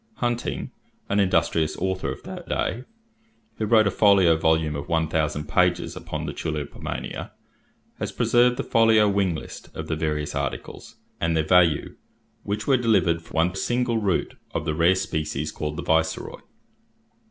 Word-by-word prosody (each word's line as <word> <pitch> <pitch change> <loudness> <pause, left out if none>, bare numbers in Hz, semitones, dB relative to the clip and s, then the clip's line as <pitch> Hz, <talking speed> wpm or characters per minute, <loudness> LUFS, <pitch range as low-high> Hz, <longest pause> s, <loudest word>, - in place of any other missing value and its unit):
Hunting, 120 -1 -2 0.4
an 100 - +2
industrious 85 -4 +1
author 95 0 -2
of - - -9
that - - -9
day, 125 +3 -2 0.7
who 110 - -1
wrote 110 -1 +5
a 105 - +2
folio 95 -5 +5
volume 80 -1 +1
of 70 0 -6
one 80 -1 +1
thousand 75 -1 -1
pages 90 0 +1
upon 80 -3 -5
the 70 - -4
tulipomania, 75 -3 -5 0.7
has - - -3
preserved 125 +1 +3
the - - -2
folio 110 -2 +4
wing 100 -4 +1
list - - -9
of - - -5
the - - -1
various 75 -1 -2
articles, 70 -1 -5 0.2
and 85 -1 +1
their 80 - +1
value, 85 -3 +3 0.4
which 105 +1 -3
were 135 -2 +4
delivered 95 -9 +2
for - - -17
one 85 +3 +2
single 120 +3 0
root 100 -4 0 0.2
of 75 - -2
the 75 - 0
rare 85 +4 +4
species 75 -4 -2
called 75 0 -4
the 85 - -4
Viceroy: 80 0 +1
florins. - - -26
85 Hz, 165 wpm, -24 LUFS, 80-100 Hz, 0.7 s, wrote